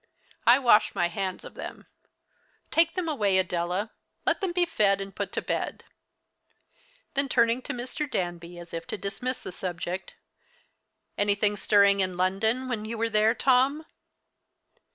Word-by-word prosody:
I 240 +2 +8
wash 240 -5 +4
my 175 0 +1
hands 185 +1 -4
of - - -10
them, - - -8 0.9
Take 330 0 +3
them 365 -3 -2
away, 210 -11 +2
Adela. 180 +3 -1 0.3
Let - - +1
them 380 -3 0
be 350 0 +2
fed 205 - +2
and 195 0 -7
put - - -3
to - - -2
bed." - - -3 1.3
Then 275 0 +1
turning 235 0 +3
to - - -5
Mr. 255 +4 -4
Danby 175 -3 -3
as 175 -1 -10
if 165 0 -5
to - - -3
dismiss 205 +7 -4
the - - -6
subject, 180 0 -5 1.0
"Anything 205 0 +2
stirring 200 -1 +4
in 185 -2 0
London 220 +8 +1
when 235 -4 -3
you 225 +1 -5
were 230 0 0
there, 215 +2 +3
Tom?" 270 +5 +3
210 Hz, 155 wpm, -27 LUFS, 185-255 Hz, 1.3 s, I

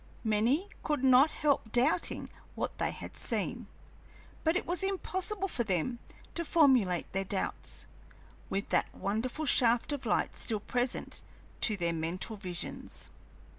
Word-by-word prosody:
Many 230 - +2
could 295 -4 -1
not 265 +3 +7
help 285 -9 0
doubting 265 +9 +2 0.2
what - - -3
they - - +1
had - - -8
seen, - - -2 0.8
but 320 +1 +3
it - - 0
was 350 0 -1
impossible 385 +1 0
for 245 - -1
them 215 +4 -1 0.3
to 340 - -1
formulate 255 - +3
their 195 +1 0
doubts, 190 0 -2 0.6
with 195 +1 -2
that - - +1
wonderful 235 +9 -2
shaft 245 0 +3
of 270 -4 -4
light - - +1
still 220 -3 0
present 245 +4 -1 0.4
to 215 -3 +4
their 170 -2 0
mental 165 +7 -2
visions. 180 -4 -4
245 Hz, 135 wpm, -31 LUFS, 200-305 Hz, 0.8 s, not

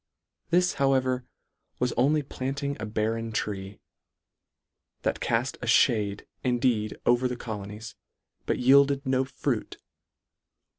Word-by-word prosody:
This, 180 +2 +3
however, 130 -2 +2 0.5
was 125 -1 0
only 145 +5 +2
planting 140 +1 -3
a 110 - -4
barren 110 +1 -1
tree, 100 -2 -4 1.2
that - - -1
call: - - +2 0.2
a - - -5 0.2
lhade 105 -3 -3 0.2
indeed 120 -4 +1
over 120 +1 +3
the 125 - -3
colonies, 105 -1 -7 0.5
but - - +1
yielded 140 +2 +4
no 130 0 +1
fruit. 135 - -3
125 Hz, 110 wpm, -27 LUFS, 110-135 Hz, 1.2 s, yielded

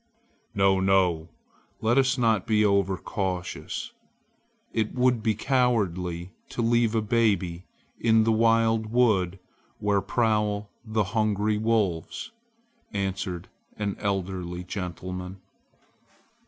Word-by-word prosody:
"No! 95 -1 +4
no! 95 -4 +2 0.5
Let 120 +4 +3
us 130 0 +2
not 115 -4 +2
be 110 -1 +3
overcautious. 95 -2 -1 0.8
It 110 -1 -1
would 125 -2 +2
be 110 -1 +1
cowardly 95 -9 0 0.2
to 120 - -2
leave 115 -1 +2
a 110 - +1
baby 100 -6 +1 0.3
in 110 -1 +4
the 115 - +2
wild 115 0 +3
wood 105 -6 +2 0.4
where 100 -1 +1
prowl 105 -3 0
the 110 -2 0
hungry 105 -1 +1
wolves!" 110 - -1 0.6
answered 95 -3 -3 0.3
an 100 -2 -2
elderly 90 -3 -3 0.4
man. 90 +1 -5
105 Hz, 100 wpm, -26 LUFS, 95-115 Hz, 0.8 s, No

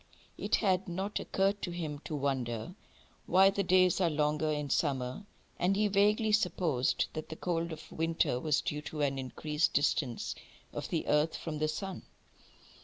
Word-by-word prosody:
It - - +1
had 190 -3 +1
not 190 +4 -2
occurred 195 +1 0
to - - -2
him 160 -4 -4
to 155 - -3
wonder 135 0 -2 0.5
why 190 +2 +6
the 200 - 0
days 185 0 +4
are 175 - +4
longer 150 0 +1
in 150 -2 -2
summer, 135 +5 -1 0.3
and 185 +3 +2
he 210 +1 +3
vaguely 210 +2 +3
supposed 175 -10 +1
that 155 - -5
the 160 - -5
cold 170 0 -2
of 160 - -9
winter 160 -6 0
was 155 +1 +1
due 150 0 -3
to 150 0 -5
an 135 -2 +1
increased 150 +4 -1
distance 145 -4 0 0.4
of - - -5
the - - -1
earth 150 +2 +2
from 155 -2 -5
the 155 - +1
sun. 190 +4 -4
160 Hz, 170 wpm, -32 LUFS, 150-185 Hz, 0.5 s, why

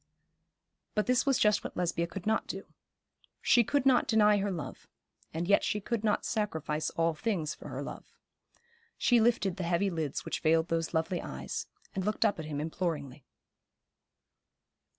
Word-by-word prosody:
But 210 - +2
this 250 +2 +2
was 270 -2 +4
just 210 -1 +3
what - - -7
Lesbia 170 -1 0
could 180 +1 -7
not 220 - +1
do. - - -5 0.8
She 240 - +5
could 280 +4 0
not 260 -2 +4
deny 210 -2 +5
her 200 0 0
love; 160 -9 -6 0.4
and 165 +2 -3
yet 200 - +4
she 210 - 0
could 220 +2 -2
not 210 -2 +1
sacrifice 160 -8 -1
all 165 0 +1
things 160 -3 -1
for - - -11
her - - -5
love. - - -9 0.8
She 240 -2 +4
lifted 220 -5 +2
the 185 - -3
heavy 175 +3 +1
lids 155 -5 -3
which - - -2
veiled 160 +1 +2
those 165 0 -1
lovely 165 +2 0
eyes, 65 0 -5 0.3
and 190 - -2
looked 210 +3 +1
up 205 -5 +1
at 155 - -4
him 150 -2 -4
imploringly. 150 -4 -3
180 Hz, 170 wpm, -31 LUFS, 160-210 Hz, 0.8 s, She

